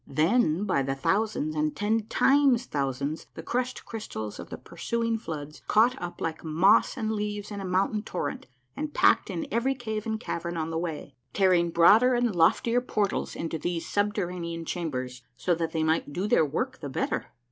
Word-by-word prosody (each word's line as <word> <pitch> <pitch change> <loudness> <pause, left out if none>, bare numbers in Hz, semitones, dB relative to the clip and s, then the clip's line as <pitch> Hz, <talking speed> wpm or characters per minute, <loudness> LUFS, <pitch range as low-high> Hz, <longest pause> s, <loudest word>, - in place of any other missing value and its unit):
Them 165 - +2
by 185 -9 +1
the 135 0 -1
thousaiuis 155 0 0
and 150 0 0
ten 215 +1 0
times 270 -3 +4
thousands 140 - -2
the 160 - -7
crushed 250 +6 -2
crystals 110 - -6
of - - -8
the - - -6
pursuing 230 -1 -2
floods 150 -6 -7
caught 235 +4 +4
up 175 0 -6
like 160 -1 -3
moss 175 - +4
and 220 -3 -1
leaves 210 -1 -3
in 200 -1 -5
a - - -5
mountain 190 +3 +1
torrent 185 -4 -4 0.3
and 300 -1 -4
packed - - +4
in 320 - -3
every 255 +4 +1
cave 220 -3 -4
and 220 0 -1
cavern 170 -5 -4
on 160 0 -2
the 165 - -1
way, 160 -4 -5 0.2
tearing 180 -3 +3
broader 215 +10 +6
and 240 -4 +1
loftier 230 +8 +3
portals 210 -5 -1
into 165 -1 -3
these 175 0 -3
subterranean 180 -5 -2
chambers, 130 -8 -4 0.2
so 175 - +1
that 165 -1 -2
they 160 -1 0
might 160 -2 +1
do 185 +7 -2
their 160 -7 +4
work 250 - -3
the 145 - -6
better 130 - -2
180 Hz, 180 wpm, -27 LUFS, 160-220 Hz, 0.3 s, broader